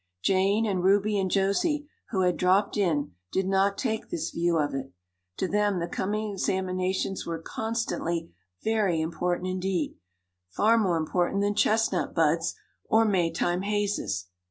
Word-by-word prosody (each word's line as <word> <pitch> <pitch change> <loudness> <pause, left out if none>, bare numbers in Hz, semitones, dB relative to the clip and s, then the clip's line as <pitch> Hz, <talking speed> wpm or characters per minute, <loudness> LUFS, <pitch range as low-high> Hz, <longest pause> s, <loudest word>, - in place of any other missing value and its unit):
Jane 195 +3 +3
and 190 -4 0
Ruby 205 +2 +3
and 190 -1 0
Josie, 245 - +1 0.2
who 190 -4 0
had 180 -1 +2
dropped 190 +3 +2
in, 165 -8 +1 0.2
did 190 0 0
not 195 +1 +2
take 220 -1 -2
this 345 -3 -3
view 170 0 +1
of 145 -3 0
it. 135 0 -4 0.5
To - - 0
them 205 0 +1
the 170 -1 -2
coming 210 +4 -2
examinations 185 0 -1
were 165 -1 -2
constantly 175 - -3 0.3
very 210 -7 +1
important 175 +3 -1
indeed 185 -3 -2 0.5
far 225 - +3
more 185 -6 +2
important 175 +4 0
than 205 0 +1
chestnut 215 -2 +1
buds 165 0 +2 0.3
or 225 +1 +4
Maytime 175 -2 +1
hazes. 205 - -1
190 Hz, 145 wpm, -27 LUFS, 175-210 Hz, 0.5 s, or